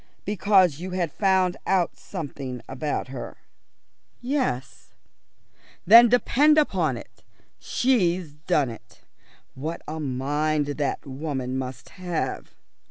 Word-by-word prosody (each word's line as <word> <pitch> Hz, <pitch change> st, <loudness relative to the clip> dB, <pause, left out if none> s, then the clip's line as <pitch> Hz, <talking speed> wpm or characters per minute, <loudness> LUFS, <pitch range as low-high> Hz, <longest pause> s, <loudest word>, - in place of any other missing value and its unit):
"Because 190 Hz, -5 st, +3 dB
you 185 Hz, +2 st, -5 dB
had 170 Hz, -4 st, -1 dB
found 190 Hz, -1 st, +2 dB
out 185 Hz, -3 st, +1 dB
something 140 Hz, -, -7 dB
about 135 Hz, 0 st, -3 dB
her?" 130 Hz, -2 st, -7 dB, 0.8 s
"Yes." 250 Hz, -, -3 dB, 0.9 s
"Then 230 Hz, +5 st, +9 dB
depend 285 Hz, +5 st, +4 dB
upon 175 Hz, -, +2 dB
it, -, -, -13 dB, 0.4 s
she's 185 Hz, -, +1 dB
done 150 Hz, -4 st, 0 dB
it. 115 Hz, -, -14 dB, 0.5 s
What 155 Hz, +5 st, -5 dB
a 160 Hz, +1 st, -5 dB
mind 145 Hz, +2 st, 0 dB
that 145 Hz, 0 st, -3 dB
woman 135 Hz, -2 st, -4 dB
must 130 Hz, -1 st, -5 dB
have!" 180 Hz, -2 st, -4 dB
160 Hz, 105 wpm, -25 LUFS, 135-190 Hz, 0.9 s, Then